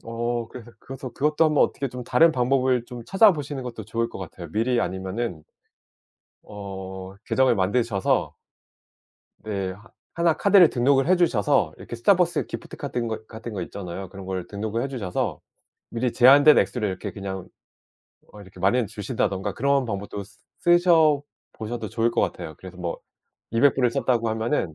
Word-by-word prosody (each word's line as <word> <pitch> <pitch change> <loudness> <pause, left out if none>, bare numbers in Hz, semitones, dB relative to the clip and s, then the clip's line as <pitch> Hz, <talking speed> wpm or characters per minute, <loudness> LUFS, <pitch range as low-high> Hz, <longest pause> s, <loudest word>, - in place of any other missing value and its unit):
어. 115 0 -3
그래서 120 -2 -11
그것도 135 -2 -8
그것도 150 +3 +2
한 155 - 0
번 - - +5
어떻게 140 - -3
좀 125 0 -7
다른 165 0 +4
방법을 125 -1 +1
좀 120 -2 -8
찾아보시는 155 - +3
것도 115 -4 -7
좋을 115 +2 -2
것 - - -9
같아요. 85 -2 -8
미리 120 +2 +1
아니면은 95 -1 -3 1.0
어 95 -2 -8
계정을 130 -3 +3
만드셔서 100 +1 0 1.1
네. 100 -3 -3 0.4
1 170 -1 +3
카드를 195 -4 +6
등록을 135 +2 +2
해 185 - +5
주셔서 135 - +2
이렇게 - - -8
스타벅스 175 - +2
기프트 - - -8
같은 120 -1 -3
거 110 -1 -5
같은 110 0 -8
거 95 -3 -4
있잖아요. 95 +1 -7
그런 95 +1 -10
거를 95 -2 -4
등록을 110 +3 -3
해 135 - -2
주셔서 105 -9 -3 0.5
미리 120 +1 -1
제한된 140 +4 +7
액수를 110 -5 0
이렇게 95 - -5
그냥 95 -2 -6 0.9
어 105 - -11
이렇게 95 -2 -15
마련해 115 +6 +3
주신다든가 100 -2 -2
그런 140 +1 +1
방법도 100 -1 -5 0.4
쓰셔 170 -4 +4 0.3
보셔도 115 +2 -5
좋을 115 0 0
것 - - 0
같아요. 80 - -3
그래서 95 -1 -11
뭐 85 -2 -4 0.5
200 135 +5 +4
불을 125 -3 +2
썼다고 115 -1 0
하면은 110 - -1
115 Hz, 350 characters per minute, -24 LUFS, 100-135 Hz, 1.1 s, 제한된